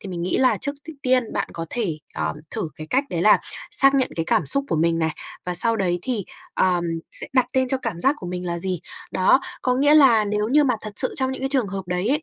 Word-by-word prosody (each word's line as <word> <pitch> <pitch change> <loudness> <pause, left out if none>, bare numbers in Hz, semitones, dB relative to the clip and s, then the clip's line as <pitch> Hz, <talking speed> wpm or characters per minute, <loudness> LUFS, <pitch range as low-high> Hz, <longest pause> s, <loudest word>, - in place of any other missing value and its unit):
thì 200 - -8
mình 175 -2 -5
nghĩ 180 - 0
là 260 - +3
trước 285 - -3 0.2
t - - -4
tiên 255 -3 +1
bạn - - -2
có 165 0 -6
thể, 195 -11 -2 0.2
ờm, - - -2
thử 160 - -3
cái 155 - -8
cách 270 +2 +2
đấy 170 -1 -1
là 210 - +6 0.3
xác 275 0 +4
nhận 265 -2 +2
cái 165 - -1
cảm 165 - +1
xúc 275 - +4
của - - 0
mình 165 +1 +1
này, 160 -1 0 0.4
và 180 - -2
sau 230 +6 +4
đấy 180 -4 0
thì, 235 -7 -2 0.3
ờm, 180 -2 +1 0.3
sẽ - - +1
đặt 255 -2 +3
tên 260 -1 +1
cho 265 - +1
cảm 225 -9 -4
giác 270 +7 +3
của 180 - -8
mình 180 0 -5
là 170 0 -2
gì. 180 -1 -3 0.3
Đó, 190 +8 +4 0.2
có 250 -1 +1
nghĩa 290 +3 +4
là 245 -8 +6
nếu 210 +1 -1
như 295 +3 +4
mà 250 -3 +2
thật 215 -1 -7
sự 255 - +2
trong 265 -1 0
những 265 - -7
cái 270 - 0
trường 260 -7 0
hợp 195 0 -4
đấy 180 +4 -1
ấy, 295 +3 +1
215 Hz, 270 wpm, -22 LUFS, 180-260 Hz, 0.4 s, là